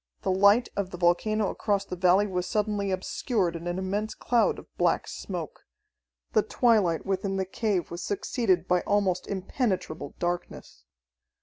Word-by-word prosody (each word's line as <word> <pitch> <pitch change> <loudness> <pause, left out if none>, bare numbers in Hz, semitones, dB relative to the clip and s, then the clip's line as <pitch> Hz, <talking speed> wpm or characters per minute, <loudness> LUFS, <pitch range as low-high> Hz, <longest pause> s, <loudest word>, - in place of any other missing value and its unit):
The - - +1
light 200 +5 +5
of 200 -2 -2
the 180 - -7
volcano 195 +4 +2
across 200 -2 -1
the 185 - -5
valley 185 +3 +4
was 180 -2 -2
suddenly 210 -1 0
obscured 185 0 -1
in 170 +1 -6
an 175 +1 -2
immense 200 +3 -2
cloud 235 -2 +2
of - - -14
black - - +1
smoke. - - -6 0.7
The - - +5
twilight 220 - +2
within 195 0 -1
the 190 - 0
cave 195 -1 -1
was 170 +1 -5
succeeded 195 -3 0
by 180 0 +3
almost 195 -3 0
impenetrable 190 - -2
darkness. 175 0 -4
190 Hz, 150 wpm, -27 LUFS, 180-210 Hz, 0.7 s, light